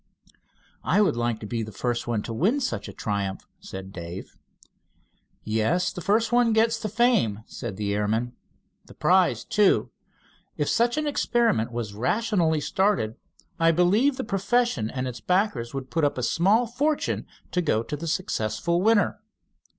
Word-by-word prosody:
"I - - +2
would 205 - +3
like 120 -1 -1
to - - -6
be 115 +2 -3
the 110 0 -5
first 120 +3 -2
one 115 -3 -1
to 115 - -5
win 205 - +2
such 260 - -3
a - - -7
triumph," 100 -2 -3
said 95 0 -9
Dave. 85 +1 -8 1.1
"Yes, 110 +12 +1
the 180 - -6
first 215 +6 +1
one 240 -2 +4
gets 225 +1 +2
the 215 - -3
fame," 215 - +2
said 105 -5 -7
the 100 -1 -1
airman. 110 +4 -1 0.5
"The - - -15
prize, - - +3
too. - - +2 0.7
If 145 - 0
such 235 +3 +2
an 305 - 0
experiment 235 - +1
was 115 -3 -4
rationally 170 - +1
started 190 - +1 0.5
I 165 0 +4
believe 200 - +3
the - - -2
profession 215 - 0
and 130 +1 -3
its 120 -3 -6
backers 180 - 0
would 135 -1 -5
put 165 -1 0
up 145 -2 +1
a 125 - -2
small 200 - +3
fortune 285 +6 -1 0.2
to 180 - +1
go 115 -9 +1
to 130 - -5
the 165 +3 -6
successful 165 - -1
winner. 220 +1 +3
165 Hz, 165 wpm, -25 LUFS, -, 1.1 s, one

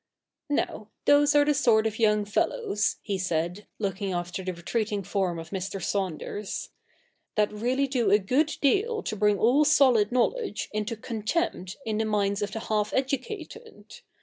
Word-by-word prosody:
' - - -63
Now, 220 -6 -2 0.2
those 290 0 +5
are 290 0 +6
the 295 - +3
sort 235 -6 +3
of 220 0 -2
young 210 -2 +3
fellows,' 210 - 0
he 200 -2 -2
said, 175 +2 -2
looking 195 -2 -2
after 175 +2 -3
the 185 - -2
retreating 205 +4 -2
form 185 -2 -1
of 165 0 -8
Mr. 195 0 -4
Saunders, 195 +2 -3 0.3
' - - -43
that 210 -1 +1
really 250 +6 0
do 250 -6 +1
a 205 - +6
good 265 +10 +1
deal 435 - +2
to - - -3
bring 210 0 +2
all 250 +8 +4
solid 255 -8 +4
knowledge 255 - 0
into 215 +2 -2
contempt 220 - -2
in 220 -1 -1
the 220 - +1
minds 205 -1 0
of 205 -1 -2
the 225 - -4
half 210 -1 -1
educated. 285 - -4
215 Hz, 170 wpm, -27 LUFS, 200-265 Hz, 0.3 s, are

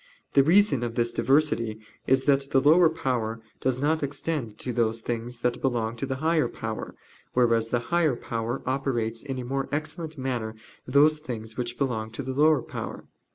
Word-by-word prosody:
The 140 - +7
reason 175 - +4
of 120 -1 -3
this 120 0 +1
diversity 130 -6 +2 0.3
is 130 0 +3
that 140 -1 +2
the 135 - +4
lower 160 +5 +6
power 120 -7 -2 0.2
does 130 -1 0
not 155 +3 +1
extend 140 -5 -3
to 125 - -4
those 115 -1 +1
things 120 +1 -4
that 125 0 0
belong 115 -3 0
to 135 - -3
the 130 - -2
higher 160 +3 +2
power; 110 -1 -5 0.4
whereas 115 -2 +3
the 120 - +2 0.2
higher 165 -6 +3
power 115 0 -3
operates 120 -4 -1
in 135 -2 -4
a 125 - -4
more 135 +2 -2
excellent 155 +1 -3
manner 120 -4 -3 0.3
those 150 +4 +4
things 115 -6 -6
which 120 -1 -3
belong 115 -5 -1
to 140 - -4
the 130 +1 -3
lower 150 -1 +4
power. - - -7
130 Hz, 180 wpm, -26 LUFS, 115-145 Hz, 0.4 s, The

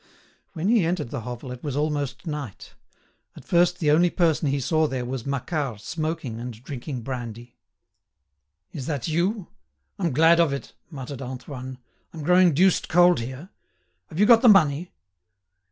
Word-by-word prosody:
When 170 +1 -3
he 225 -3 +4
entered 165 -7 -2
the 135 - -4
hovel 125 +2 -7
it 125 -1 -9
was 145 -4 -3
almost 145 -3 -2
night. 150 - -6 0.6
At - - -13
first 175 +1 +3
the 155 -5 +2
only 170 +4 +4
person 165 -3 +1
he 140 +1 0
saw 155 +3 +1
there 130 -3 -3
was 125 0 -5
Macquart 140 - -2
smoking 155 -3 -4
and 120 0 -6
drinking 130 -2 -6
brandy. 120 -2 -7 1.2
"Is 130 - -6
that 145 -6 -2
you? 175 +5 -1 0.5
I'm 175 -4 0
glad 165 +5 +5
of 165 -5 +3
it," 140 - -6 0.2
muttered 135 -3 -7
Antoine. 130 0 -7 0.4
"I'm 155 - -6
growing 180 -1 +4
deuced 185 +3 +3
cold 175 -1 +5
here. 130 +9 -7 0.6
Have 155 - -8
you 210 - +6
got 230 0 +7
the 245 - +7
money?" 170 -4 +4
150 Hz, 160 wpm, -24 LUFS, 130-170 Hz, 1.2 s, got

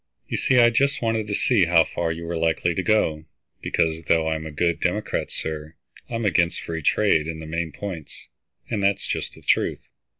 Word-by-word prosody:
"You - - -3
see 135 - +2
I 120 -1 +7
just 140 +2 +1
wanted 110 -2 0
to 105 - -1
see 105 -6 +3
how 85 -1 +5
far 80 +1 -2
you 85 +1 -5
were 85 +1 -3
likely 80 +1 +1
to 95 - -1
go, 80 -7 +1 0.4
because, 80 -1 0
though 80 0 +2
I'm 80 0 -3
a - - -7
good 85 +3 0
Democrat, - - -1
sir, 80 0 -5 0.3
I'm 115 -1 -2
against 85 -3 +2
free 80 -1 -4
trade 80 -1 +2
in 80 -1 -4
the 80 - -8
main 80 +1 -3
points, 90 -3 -8 0.4
and 110 -4 -2
that's 100 0 +2
just - - -3
the - - -16
truth. - - 0
85 Hz, 200 wpm, -24 LUFS, 80-105 Hz, 0.4 s, I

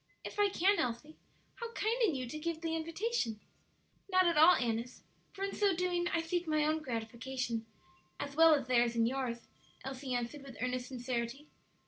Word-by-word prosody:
"If - - -7
I 410 -1 +5
can, 395 +2 +3
Elsie. 250 +6 -2 0.4
How 470 -1 -5
kind 460 +4 0
in 365 -10 +3
you 255 -1 -3
to 305 - -5
give 330 0 -3
the 325 -1 -1
invitation!" 325 - -2 0.7
"Not 370 0 +5
at 340 -1 +3
all, 320 +4 +8
Annis; 235 +1 -2 0.3
for 390 -1 -6
in 395 - -2
so 400 -3 +2
doing 350 0 0
I 335 -1 0
seek 345 +1 -2
my 305 -1 +2
own 310 +1 +1
gratification 235 -1 -3 0.5
as 280 0 -5
well 325 0 +7
as 280 - -2
theirs 240 -2 +3
and 230 0 +3
yours," 245 -2 -3 0.4
Elsie 265 -1 -4
answered, 245 +4 -3
with 270 -3 -11
earnest 250 +1 -2
sincerity. 250 +2 -4
290 Hz, 180 wpm, -33 LUFS, 245-340 Hz, 0.7 s, all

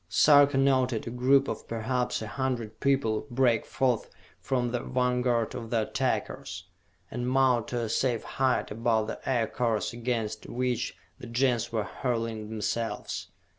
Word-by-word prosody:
Sarka 145 -2 +6
noted 130 -4 +2
a 115 - -4
group 135 +3 +3
of - - -5
perhaps 120 +1 -1
a - - -5
hundred 120 -3 -3
people 135 -4 +1
break 120 -3 +2
forth 125 -4 0 0.3
from 125 -3 -1
the 120 - 0
vanguard 125 -2 0
of 115 -2 -6
the 115 -2 +1
attackers, - - -2 0.5
and 125 +1 -2
mount 130 -3 +3
to 120 -1 -2
a 115 - -2
safe 120 +1 0
height 130 -1 0
above 110 0 +1
the - - -5
Aircars 115 -3 0
against 115 -3 -3
which 125 -1 -1 0.2
the 120 - -8
Gens 120 0 +1
were 110 -2 0
hurling 115 +1 -3
themselves. 110 +1 -3
120 Hz, 145 wpm, -28 LUFS, 115-130 Hz, 0.5 s, Sarka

